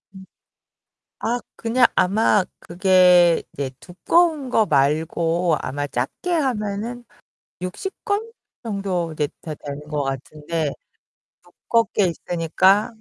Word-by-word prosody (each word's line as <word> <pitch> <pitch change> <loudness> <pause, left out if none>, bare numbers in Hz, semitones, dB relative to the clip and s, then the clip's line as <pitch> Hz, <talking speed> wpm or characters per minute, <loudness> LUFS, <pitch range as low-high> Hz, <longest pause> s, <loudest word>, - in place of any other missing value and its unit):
음 190 0 -11 1.0
아 240 +2 -1 0.2
그냥 235 +2 +2
아마 205 +1 +3 0.2
그게 180 -1 +4
이제 135 -2 -4
두꺼운 300 - +1
거 220 -3 +3
말고 160 +3 +1
아마 145 +2 -3
작게 130 - -3
하면은 240 -5 -2 0.6
60 185 - -5
권 425 +3 -1 0.3
정도 195 -6 -2
이제 150 -2 -1
되 155 - -6
되는 145 0 -7
것 150 -2 -1
같은데 150 +3 -3 1.0
두껍게 230 -4 +3
있으니까 175 +5 +2
180 Hz, 195 characters per minute, -22 LUFS, 155-225 Hz, 1.0 s, 그게